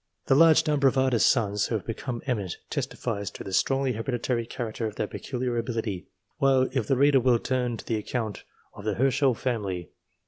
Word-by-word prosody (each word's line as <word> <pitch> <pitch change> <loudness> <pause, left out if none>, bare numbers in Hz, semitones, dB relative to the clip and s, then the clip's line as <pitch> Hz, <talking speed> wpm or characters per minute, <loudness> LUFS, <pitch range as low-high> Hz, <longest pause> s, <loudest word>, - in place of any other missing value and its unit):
The - - +3
large 160 +2 +6
number 145 -2 +3
of 135 - +1
artists' 130 -3 +4
sons 105 -4 +1
who 115 - -1
have 105 - -3
become 120 +1 -5
eminent, 105 -9 -2
testifies 100 -5 -3
to - - -9
the 95 - -7
strongly 135 +5 +2
hereditary 120 0 -2
character 115 -3 -4
of 105 - -7
their - - -1
peculiar 125 +2 -3
ability, 115 -5 -3 0.3
while, 135 -2 +4
if 130 -6 -1
the 135 - +2
reader 140 0 +5
will 125 -1 +3
turn 125 -1 -1
to - - -10
the 115 - -1
account 110 0 -4 0.3
of 105 - -11
the 105 -1 -1
Herschel 135 0 +2
family, 105 -8 -2
p. - - -22
120 Hz, 200 wpm, -27 LUFS, 110-130 Hz, 0.3 s, large